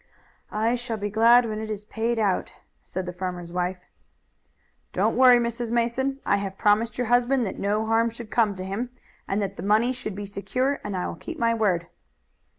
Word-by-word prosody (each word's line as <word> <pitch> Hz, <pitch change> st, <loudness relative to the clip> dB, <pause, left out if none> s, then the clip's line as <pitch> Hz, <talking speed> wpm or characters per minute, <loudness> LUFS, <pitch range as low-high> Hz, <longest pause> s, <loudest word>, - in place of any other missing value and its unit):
"I 220 Hz, +3 st, +1 dB
shall 240 Hz, -2 st, -3 dB
be 205 Hz, 0 st, -3 dB
glad 235 Hz, +3 st, +6 dB
when 215 Hz, -1 st, -3 dB
it 220 Hz, -, -5 dB
is 210 Hz, -1 st, -5 dB
paid 230 Hz, +2 st, -1 dB
out," 205 Hz, -4 st, 0 dB, 0.3 s
said 185 Hz, 0 st, -5 dB
the 180 Hz, -, -5 dB
farmer's 180 Hz, -1 st, -5 dB
wife. 180 Hz, +1 st, -1 dB, 1.2 s
"Don't -, -, +1 dB
worry, 250 Hz, -1 st, +7 dB
Mrs. 235 Hz, 0 st, -2 dB
Mason. 240 Hz, +3 st, 0 dB
I 200 Hz, -, +3 dB
have 195 Hz, -1 st, -4 dB
promised 215 Hz, +3 st, +2 dB
your 250 Hz, -, 0 dB
husband 245 Hz, +2 st, +3 dB
that 190 Hz, -, -5 dB
no 210 Hz, +2 st, 0 dB
harm 225 Hz, +1 st, +2 dB
should 230 Hz, -1 st, -10 dB
come 215 Hz, -4 st, +2 dB
to 185 Hz, 0 st, -6 dB
him, 210 Hz, +6 st, -3 dB, 0.4 s
and 195 Hz, -, 0 dB
that 195 Hz, 0 st, -4 dB
the -, -, -5 dB
money 220 Hz, +5 st, +3 dB
should 245 Hz, -6 st, -6 dB
be 205 Hz, 0 st, -5 dB
secure 255 Hz, +8 st, -1 dB
and 205 Hz, -2 st, -3 dB
I 180 Hz, -, -1 dB
will -, -, -3 dB
keep 335 Hz, -, -8 dB
my 230 Hz, -5 st, +2 dB
word." 195 Hz, -7 st, +1 dB
220 Hz, 200 wpm, -25 LUFS, 200-240 Hz, 1.2 s, worry